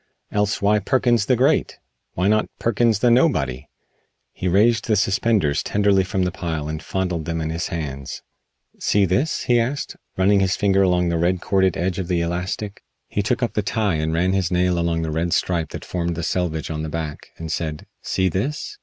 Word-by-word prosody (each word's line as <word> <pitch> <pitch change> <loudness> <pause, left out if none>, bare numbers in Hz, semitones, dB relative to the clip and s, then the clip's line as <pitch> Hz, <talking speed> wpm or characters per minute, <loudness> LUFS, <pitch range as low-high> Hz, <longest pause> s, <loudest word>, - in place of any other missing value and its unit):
Else 105 0 0
why 105 +1 +4
Perkins 120 -3 +2
the 130 - +4
Great? 130 +3 +2 0.4
Why 90 +2 +1
not 110 +1 +2
Perkins 115 -1 +2
the 120 - +4
Nobody?" 75 - +2 0.7
He 95 - -3
raised 110 +6 +3
the 110 - +3
suspenders 100 -5 +2
tenderly 100 -2 +2
from 95 0 -1
the 90 - 0
pile 80 -3 -4
and 80 0 -4
fondled 90 -1 -2
them 80 +1 -2
in 80 0 -2
his 85 +1 -2
hands. 70 -5 -5 0.6
"See 100 -1 +3
this?" 95 - 0
he 120 -1 +3
asked, 130 +5 -2 0.2
running 100 +2 +4
his 95 0 +2
finger 100 -1 +2
along 90 -2 +2
the 85 -1 0
red 90 +2 +1
corded 95 -1 +1
edge 90 +2 -1
of 90 - -3
the 85 -2 +1
elastic. 90 +4 -3 0.3
He 105 - 0
took 115 +4 0
up 120 - -1
the 105 - +1
tie 105 -1 0
and 80 0 -1
ran 90 +3 +1
his 95 -3 +1
nail 90 -1 +1
along 85 -1 0
the 80 - -2
red 85 +2 -1
stripe 85 -4 0
that - - -8
formed 85 -1 -2
the 85 - -4
selvedge 80 -2 -1
on 75 -1 -3
the 80 - -4
back, 75 -2 -5
and 80 -1 -5
said: 80 -2 -3 0.2
"See 95 0 0
this?" 150 - -3
90 Hz, 200 wpm, -22 LUFS, 85-105 Hz, 0.7 s, why